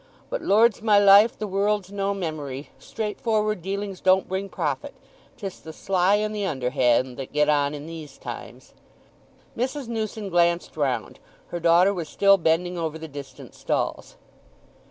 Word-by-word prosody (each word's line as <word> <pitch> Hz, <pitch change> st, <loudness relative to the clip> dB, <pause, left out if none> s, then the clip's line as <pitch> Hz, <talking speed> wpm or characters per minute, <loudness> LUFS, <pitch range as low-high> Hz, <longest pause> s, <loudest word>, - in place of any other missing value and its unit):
But -, -, -2 dB
Lord's 220 Hz, +2 st, +3 dB
my 215 Hz, -2 st, +4 dB
life—the 205 Hz, +2 st, +6 dB
world's 200 Hz, 0 st, 0 dB
no 200 Hz, 0 st, -1 dB
memory; 150 Hz, -6 st, -5 dB
straightforward 215 Hz, -2 st, -2 dB
dealings 195 Hz, +1 st, -4 dB
don't 190 Hz, 0 st, +3 dB
bring 190 Hz, +1 st, -3 dB
profit—'tis 210 Hz, -, -6 dB
the 160 Hz, -, -10 dB
sly 190 Hz, +3 st, +2 dB
and 215 Hz, +1 st, -1 dB
the 205 Hz, -, -2 dB
underhand 125 Hz, -5 st, +1 dB
that 135 Hz, -, -7 dB
get 150 Hz, 0 st, +2 dB
on 145 Hz, 0 st, +2 dB
in 145 Hz, 0 st, -8 dB
these 160 Hz, -4 st, -9 dB
times!" -, -, -9 dB, 0.8 s
Mrs. 260 Hz, +2 st, -3 dB
Newson 220 Hz, -3 st, -4 dB
glanced 170 Hz, -1 st, +1 dB
round—her 145 Hz, +4 st, -4 dB
daughter 170 Hz, +4 st, +4 dB
was 170 Hz, -5 st, -5 dB
still 195 Hz, 0 st, +4 dB
bending 175 Hz, +2 st, +1 dB
over 160 Hz, -1 st, -3 dB
the 160 Hz, 0 st, -8 dB
distant 140 Hz, -3 st, -10 dB
stalls. -, -, -3 dB
185 Hz, 140 wpm, -24 LUFS, 155-205 Hz, 0.8 s, life—the